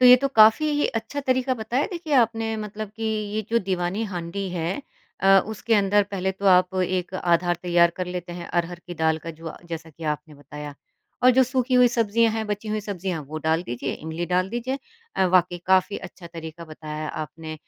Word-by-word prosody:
तो 250 Hz, -, +7 dB
ये 250 Hz, -, +10 dB
तो 275 Hz, -, +2 dB
काफ़ी 285 Hz, +6 st, +5 dB
अच्छा 225 Hz, +5 st, -3 dB
तरीका 260 Hz, -1 st, +1 dB
बताया 240 Hz, +4 st, -1 dB
देखिए 335 Hz, -4 st, -5 dB
आपने 225 Hz, -2 st, +2 dB
मतलब 210 Hz, 0 st, -5 dB
कि 225 Hz, -, -7 dB, 0.3 s
ये 215 Hz, -, +1 dB
जो 235 Hz, -, +4 dB
दीवानी 185 Hz, 0 st, -1 dB
हांडी 185 Hz, 0 st, -4 dB
है 175 Hz, -, -2 dB, 0.4 s
अ, 195 Hz, 0 st, +7 dB
उसके 220 Hz, +1 st, -1 dB
अंदर 205 Hz, 0 st, +4 dB
पहले 190 Hz, -1 st, -1 dB
तो 200 Hz, +1 st, -4 dB
आप 185 Hz, 0 st, +5 dB
एक 185 Hz, 0 st, -2 dB
आधार 175 Hz, -1 st, +2 dB
तैयार 170 Hz, -1 st, +4 dB
कर 185 Hz, -1 st, -2 dB
लेते 180 Hz, -1 st, -5 dB
हैं 175 Hz, 0 st, -7 dB
अरहर 175 Hz, 0 st, -1 dB
की 175 Hz, -, -6 dB
दाल 160 Hz, -1 st, +1 dB
का 165 Hz, +2 st, -7 dB
जो 165 Hz, 0 st, -8 dB, 0.2 s
जैसा 165 Hz, -1 st, -6 dB
कि 160 Hz, +2 st, -11 dB
आपने 150 Hz, 0 st, -3 dB
बताया, 145 Hz, +1 st, -9 dB, 0.5 s
और 250 Hz, -, +8 dB
जो 260 Hz, +1 st, +5 dB
सूखी 255 Hz, 0 st, 0 dB
हुई 250 Hz, 0 st, +7 dB
सब्जियाँ 230 Hz, -1 st, +2 dB
हैं 220 Hz, 0 st, -2 dB
बची 210 Hz, +1 st, -3 dB
हुई 215 Hz, 0 st, -1 dB
सब्जियाँ 190 Hz, -5 st, -4 dB
वो 155 Hz, +1 st, -4 dB
डाल 160 Hz, +2 st, +2 dB
दीजिए 130 Hz, -2 st, -4 dB
इमली 160 Hz, +2 st, -5 dB
डाल 180 Hz, +1 st, +1 dB
दीजिए। 245 Hz, +4 st, -2 dB, 0.4 s
अ, 190 Hz, -, +3 dB
वाक़ई 180 Hz, -1 st, +3 dB
काफ़ी 190 Hz, +2 st, +3 dB
अच्छा 180 Hz, -1 st, -10 dB
तरीका 165 Hz, 0 st, -8 dB
बताया 155 Hz, -1 st, -6 dB
आपने। 155 Hz, +1 st, -6 dB
185 Hz, 200 wpm, -24 LUFS, 170-225 Hz, 0.5 s, ये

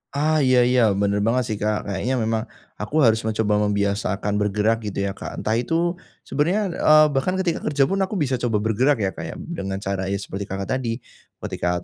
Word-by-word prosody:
Ah, 155 Hz, +2 st, +2 dB
iya 130 Hz, -3 st, +4 dB
iya, 125 Hz, +1 st, +3 dB
bener 100 Hz, +1 st, +1 dB
banget 115 Hz, +5 st, +1 dB
sih, 105 Hz, -, -2 dB
Kak. 105 Hz, 0 st, 0 dB
Kayaknya 100 Hz, +6 st, -2 dB
memang 110 Hz, 0 st, 0 dB, 0.4 s
aku 105 Hz, +8 st, -5 dB
harus 110 Hz, -2 st, +4 dB
mencoba 105 Hz, -1 st, +1 dB
membiasakan 100 Hz, 0 st, -1 dB
bergerak, 105 Hz, +2 st, +1 dB
gitu 100 Hz, -1 st, -2 dB
ya, 100 Hz, -, -1 dB
Kak. -, -, -7 dB
Entah -, -, -1 dB
itu 170 Hz, +7 st, 0 dB, 0.2 s
sebenarnya, 180 Hz, +7 st, 0 dB
eee, 155 Hz, 0 st, +6 dB
bahkan 140 Hz, +7 st, 0 dB
ketika 185 Hz, -3 st, 0 dB
kerja 145 Hz, -2 st, +1 dB
pun, 195 Hz, +8 st, 0 dB
aku 190 Hz, +2 st, -1 dB
bisa 135 Hz, -8 st, 0 dB
coba 120 Hz, -2 st, -1 dB
bergerak 115 Hz, +3 st, +2 dB
ya 95 Hz, -, 0 dB
Kak 85 Hz, -, -7 dB
ya, -, -, -7 dB
dengan 95 Hz, -, -5 dB
cara 95 Hz, -1 st, -2 dB
ya 100 Hz, -, -1 dB
seperti 100 Hz, 0 st, -5 dB
Kakak, 95 Hz, 0 st, -4 dB
tadi. 115 Hz, -3 st, -2 dB, 0.5 s
Ketika 90 Hz, 0 st, -2 dB
110 Hz, 200 wpm, -22 LUFS, 100-145 Hz, 0.5 s, eee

